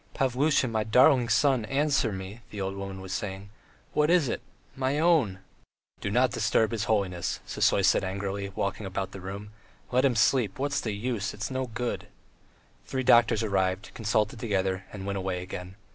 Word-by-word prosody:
"Pavlusha, 135 +1 +2
my 110 -2 0
darling 125 +2 +5
son, 125 +1 +3
answer 135 -3 +1
me," 95 +4 -7
the 105 - -7
old 95 0 -2
woman 100 -1 -6
was 95 -1 -6
saying. 100 0 -5 0.4
"What 150 +1 +3
is 170 -5 +4
it? - - -2 0.3
My 135 +2 0
own!" 150 - +3 0.6
"Don't - - +2
disturb 110 0 +2
his 110 -3 -1
holiness," 95 -5 0
Sisoy - - +2
said - - +4
angrily, 100 +1 -3
walking 100 +1 -2
about 95 0 -3
the 95 - -9
room. 100 +3 -7 0.4
"Let 125 +1 +3
him 135 -3 +3
sleep... 110 -2 +2
what's 140 +1 -1
the 110 - -2
use... 105 -2 -2
it's 105 +5 -4
no 130 0 -2
good... 120 +1 -4 0.4
." - - -34
Three 130 0 -2
doctors 120 -2 +5
arrived, 95 -1 0
consulted 110 +2 0
together, 95 -4 -1
and 100 -2 -7
went 100 0 -2
away 95 -1 -2
again. 90 0 -7
105 Hz, 175 wpm, -28 LUFS, 95-130 Hz, 0.6 s, darling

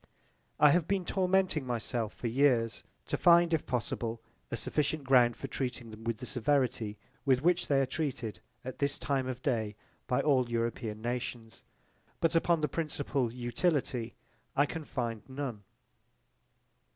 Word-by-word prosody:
I 150 -1 +8
have 170 +1 +2
been 195 -2 0
tormenting 185 -4 +2
myself 120 -2 -2
for - - -10
years 120 -2 +2 0.2
to - - -1
find 170 -1 +6
if 160 - 0
possible 115 -2 -2 0.3
a - - -3
sufficient 150 0 -1
ground 125 -3 +5
for - - -7
treating 125 -4 -4
them 110 +1 -11
with 115 -1 -1
the 125 - -7
severity 125 -4 0 0.3
with 130 -1 +3
which 175 +1 +3
they 140 -2 +3
are - - +2
treated 130 -6 -3 0.3
at 130 - -6
this 140 0 0
time 135 -2 -1
of 130 0 -5
day 110 -6 0 0.3
by 125 - +2
all 130 -5 +3
European 115 -2 -2
nations: 120 -2 -4 0.6
but 165 - +2
upon 165 -1 +3
the 150 - +2
principle 140 -5 -1
utility 125 -1 -1 0.4
I 145 - +5
can 160 +1 -6
find 115 -6 -3
none. 130 -5 -4
130 Hz, 150 wpm, -31 LUFS, 115-150 Hz, 0.6 s, I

